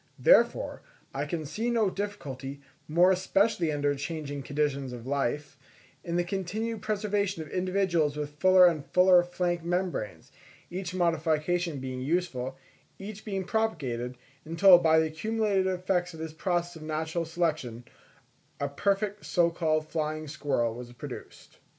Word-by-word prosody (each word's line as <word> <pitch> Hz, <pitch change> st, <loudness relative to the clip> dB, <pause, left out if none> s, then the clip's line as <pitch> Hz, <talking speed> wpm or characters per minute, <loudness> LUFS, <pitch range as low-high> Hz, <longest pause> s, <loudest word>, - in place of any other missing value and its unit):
Therefore, -, -, +3 dB, 0.3 s
I -, -, -2 dB
can 165 Hz, -4 st, -3 dB
see 225 Hz, +11 st, -2 dB
no 225 Hz, -5 st, +2 dB
difficulty, 140 Hz, -10 st, -5 dB, 0.3 s
more 175 Hz, +4 st, +5 dB
especially 190 Hz, -2 st, +2 dB
under 145 Hz, -1 st, +1 dB
changing 145 Hz, 0 st, -4 dB
conditions 140 Hz, -2 st, -1 dB
of 120 Hz, -1 st, -8 dB
life, 140 Hz, +1 st, -2 dB, 0.4 s
in 170 Hz, -1 st, -3 dB
the 175 Hz, -, +2 dB
continued 205 Hz, +5 st, -3 dB
preservation 205 Hz, -4 st, -1 dB
of 155 Hz, -, -12 dB
individuals 180 Hz, -5 st, +1 dB
with 150 Hz, 0 st, -5 dB
fuller 185 Hz, -1 st, +7 dB
and 165 Hz, -5 st, +3 dB
fuller 180 Hz, +3 st, +5 dB
flank 175 Hz, -1 st, -2 dB
membranes, 175 Hz, -, -3 dB, 0.4 s
each 180 Hz, 0 st, -4 dB
modification 165 Hz, -1 st, +1 dB
being 130 Hz, -1 st, -5 dB
useful, 135 Hz, -4 st, -1 dB, 0.4 s
each 205 Hz, +2 st, -8 dB
being 195 Hz, -3 st, -3 dB
propagated, 135 Hz, -, -2 dB, 0.3 s
until, 175 Hz, +3 st, +7 dB
by 160 Hz, -2 st, +4 dB
the 160 Hz, -, +4 dB
accumulated 200 Hz, +4 st, 0 dB
effects 180 Hz, -1 st, -1 dB
of -, -, -11 dB
this 160 Hz, -1 st, -5 dB
process 175 Hz, 0 st, -1 dB
of -, -, -12 dB
natural 160 Hz, +2 st, -2 dB
selection, 155 Hz, -8 st, -2 dB, 0.8 s
a 140 Hz, -, 0 dB
perfect 200 Hz, +6 st, -1 dB
so 170 Hz, -2 st, +2 dB
called 155 Hz, -2 st, 0 dB
flying 155 Hz, -1 st, -3 dB
squirrel 140 Hz, -6 st, -1 dB
was 120 Hz, +1 st, -9 dB
produced. 120 Hz, -, -10 dB
170 Hz, 140 wpm, -28 LUFS, 145-185 Hz, 0.8 s, fuller